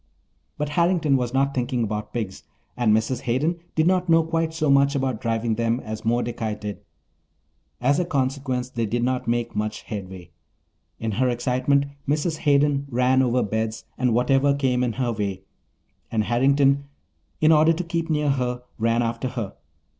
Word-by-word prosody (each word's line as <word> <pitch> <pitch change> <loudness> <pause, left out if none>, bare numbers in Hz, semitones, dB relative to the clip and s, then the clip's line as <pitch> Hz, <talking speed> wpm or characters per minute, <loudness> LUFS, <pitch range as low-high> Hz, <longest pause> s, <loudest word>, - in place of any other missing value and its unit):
But 150 0 -2
Harrington 170 -2 +2
was 125 -2 0
not 135 +1 +1
thinking 125 -1 -1
about 105 -1 -3
pigs, 105 -9 -4 0.3
and 120 -3 +2
Mrs. 110 +4 +1
Hayden 140 +7 0 0.2
did 155 - +3
not 180 0 +2
know 165 0 +5
quite 165 0 -1
so 155 -3 +1
much 140 +1 +4
about 130 -5 -1
driving 115 -1 0
them 115 +2 0
as 110 -1 -6
Mordecai 115 -1 -1
did; 105 -1 -6 1.0
as 140 +5 +2
a 180 - +1
consequence 130 -4 -1
they 115 -3 -1
did 120 +3 -1
not 125 0 -1
make 120 0 -1
much 105 0 -3
headway. 95 -5 -7 0.7
In 110 0 -2
her 125 +5 +1
excitement 130 +3 +1 0.2
Mrs. 155 +2 0
Hayden 140 -1 +2
ran 125 +1 +3
over 125 -1 +2
beds 110 +1 -2
and 125 -1 +1
whatever 135 +3 +3
came 130 -3 +1
in 120 -2 0
her 125 -1 -1
way, 100 -3 -3 0.7
and 110 -2 +1
Harrington, 140 +4 +3 0.5
in 155 +1 +5
order 155 +1 +6
to 165 +2 -1
keep 165 0 -3
near 150 -2 +2
her, 125 -2 -2 0.2
ran 115 +1 +2
after 115 +2 -2
her. 115 -6 -4
125 Hz, 170 wpm, -24 LUFS, 115-140 Hz, 1.0 s, order